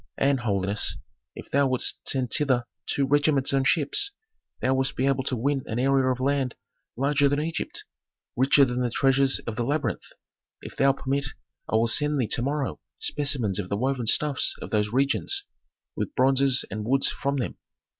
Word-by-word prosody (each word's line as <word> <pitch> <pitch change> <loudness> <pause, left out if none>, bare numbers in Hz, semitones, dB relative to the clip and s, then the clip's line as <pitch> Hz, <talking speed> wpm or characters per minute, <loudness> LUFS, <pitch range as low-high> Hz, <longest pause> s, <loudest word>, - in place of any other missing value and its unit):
And, 135 -1 +2
holiness, 100 -2 0 0.4
if - - -11
thou 140 0 +3
wouldst 130 -1 -2
send 130 -3 -1
thither 130 -5 +2 0.2
two 140 - +1
regiments 145 -1 +2
on 135 -1 +2
ships, 165 - +1 0.5
thou 130 - +1
wouldst 135 0 0
be 130 - 0
able 135 -1 +1
to 130 - -1
win 135 +4 0
an 110 - -3
area 135 0 +2
of 125 - -3
land 135 -2 0 0.4
larger 140 +2 +2
than 145 +1 0
Egypt, 160 +2 -4 0.5
richer 135 +3 +5
than 125 0 -2
the 125 - 0
treasures 135 +2 +3
of 110 -2 -5
the 120 - 0
labyrinth. 145 +5 -2 0.5
If - - -10
thou 135 0 +4
permit, 140 +1 -2 0.4
I - - 0
will 115 +1 +4
send 150 +4 +2
thee 125 - +2
to - - 0
morrow 140 +1 -2 0.2
specimens 130 -9 0
of 95 -2 -4
the 100 - -1
woven 130 0 -1
stuffs 145 +3 +2
of - - -8
those 105 -1 +1
regions, 140 - +1 0.5
with 295 - -4
bronzes 135 0 +3
and 105 0 -4
woods 135 +5 +2
from 140 0 -2
them. 125 - -3
135 Hz, 180 wpm, -26 LUFS, 125-140 Hz, 0.5 s, richer